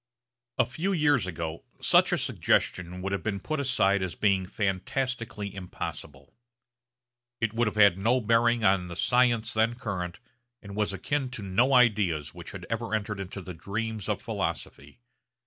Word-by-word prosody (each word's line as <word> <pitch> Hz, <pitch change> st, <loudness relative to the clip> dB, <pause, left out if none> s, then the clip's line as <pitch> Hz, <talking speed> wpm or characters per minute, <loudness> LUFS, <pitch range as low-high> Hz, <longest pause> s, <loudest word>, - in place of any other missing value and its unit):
A -, -, +4 dB
few 165 Hz, +11 st, -2 dB
years 145 Hz, -, +3 dB
ago 80 Hz, -2 st, -5 dB, 0.2 s
such -, -, +5 dB
a -, -, +2 dB
suggestion 90 Hz, +1 st, 0 dB
would 95 Hz, -, -2 dB
have 100 Hz, -, -1 dB
been 100 Hz, -2 st, -2 dB
put 155 Hz, -, -3 dB
aside 100 Hz, -8 st, +2 dB
as 95 Hz, -2 st, -3 dB
being 95 Hz, -3 st, +1 dB
fantastically 105 Hz, +2 st, -2 dB
impossible. 75 Hz, -7 st, -7 dB, 1.1 s
It 115 Hz, -1 st, 0 dB
would 115 Hz, 0 st, +1 dB
have 105 Hz, -, -2 dB
had 100 Hz, -3 st, +5 dB
no 120 Hz, +6 st, +3 dB
bearing 115 Hz, 0 st, +2 dB
on 95 Hz, -2 st, +3 dB
the 85 Hz, -, -7 dB
science 120 Hz, +1 st, +2 dB
then 110 Hz, +2 st, +2 dB
current, 95 Hz, -7 st, -4 dB, 0.4 s
and 100 Hz, -2 st, -10 dB
was 105 Hz, -1 st, 0 dB
akin 130 Hz, +8 st, -2 dB
to 125 Hz, -5 st, -6 dB
no 115 Hz, +8 st, +2 dB
ideas 100 Hz, -, +3 dB
which -, -, -9 dB
had -, -, -8 dB
ever 115 Hz, -1 st, -2 dB
entered 105 Hz, -1 st, -3 dB
into 95 Hz, 0 st, -6 dB
the 90 Hz, -, -7 dB
dreams 105 Hz, +4 st, -4 dB
of -, -, 0 dB
philosophy. 70 Hz, -, -4 dB
105 Hz, 165 wpm, -28 LUFS, 95-120 Hz, 1.1 s, such